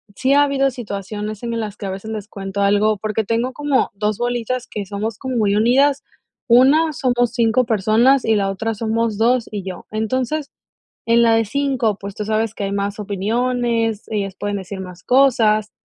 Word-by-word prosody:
sí 265 +1 +1
ha 285 - +6
habido 275 -1 +2
situaciones 210 -1 -6
en 230 -1 -2
las 210 -2 -5
que 205 - -7
a 195 - -3
veces 195 +3 -7
les 215 -2 -5
cuento 195 -1 -5
algo, 205 +2 +3
porque 215 +2 -2
tengo 235 +4 -1
como 290 -2 0
2 210 0 -1
bolitas 245 +1 -2
que 205 -3 -6
somos 210 +2 -4
como 260 -1 -4
muy 205 -2 +2
unidas. 270 +6 +3 0.4
1, 280 +7 +5
somos 245 -3 +1
5 235 +1 +2
personas 230 +5 +3
y 225 - +3
la 195 -1 +1
otra 220 +4 -2
somos 225 0 -1
2 235 +1 +2
y 205 -2 -4
yo. 185 -1 -7
Entonces, 255 +7 -2 0.6
en 235 +1 +4
la 230 -1 +5
de 225 - +3
5, 260 -4 0
pues 200 0 -7
tú 210 - -4
sabes 220 0 0
que 200 - -4
hay 195 - -2
más 200 +1 -2
opiniones, 225 +2 -1
ellas 200 -3 -3
pueden 205 0 -2
decir 190 0 -7
más 180 -1 -10
cosas, 225 -5 +3
220 Hz, 190 wpm, -20 LUFS, 205-245 Hz, 0.6 s, ha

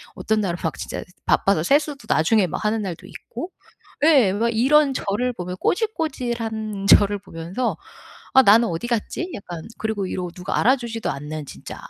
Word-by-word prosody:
어떤 220 0 0
날은 175 -4 -1
막 165 - -2
진짜 - - -5 0.2
바빠서 195 -5 +3
세수도 285 - +1
나중에 190 +4 +3
막 170 - -5
하는 215 +1 +1
날도 185 -1 -6
있고. 265 - -8 0.5
예. 270 -12 +5
막 230 +3 +1
이런 275 +5 +4
저를 240 +6 -1
보며 180 -4 -5
꼬질꼬질한 235 - -2
저를 205 0 +5
보면서 185 +5 -4 0.6
'아 265 - +8
나는 225 +2 +6
어디 165 +7 -3
갔지?' 240 - -2
약간 175 -5 -8
그리고 220 -3 -2
이런 180 -1 -3
누가 180 +1 -4
알아주지도 235 -2 +1
않는 150 +1 -6
진짜 - - -9
220 Hz, 335 characters per minute, -22 LUFS, 185-250 Hz, 0.6 s, 아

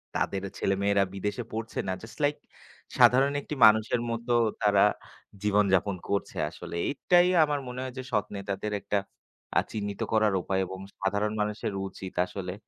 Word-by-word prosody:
তাদের 95 - -1 0.2
ছেলেমেয়েরা 100 +1 +2
বিদেশে 105 +4 -3
পড়ছে 110 0 -4
না 95 - 0
জাস্ট 110 - -12
লাইক 145 +1 +3 0.6
সাধারণ 135 +3 +6
একটি 150 - -6
মানুষের 110 +2 +4
মতো 115 +1 -2 0.3
তারা 100 -1 +4 0.6
জীবন 105 0 +3
যাপন 95 +1 +2
করছে 100 0 -2
আসলে। - - -8 0.2
এটাই 175 +5 +4 0.2
আমার 145 -2 0
মনে 125 0 -6
হয় 130 -1 -6
যে 130 - -4
সৎ 105 -3 +1
নেতাদের 100 +1 -4
একটা 105 - -1 0.6
আ - - +3
চিহ্নিত 100 -2 -4
করার 110 -2 +3
উপায় 95 +1 -1
এবং 95 +1 -8 0.2
সাধারণ 100 +2 0
মানুষের 105 -1 -2
উচিত 95 -1 -9
আসলে 90 -1 -6
105 Hz, 155 wpm, -28 LUFS, 100-115 Hz, 0.6 s, সাধারণ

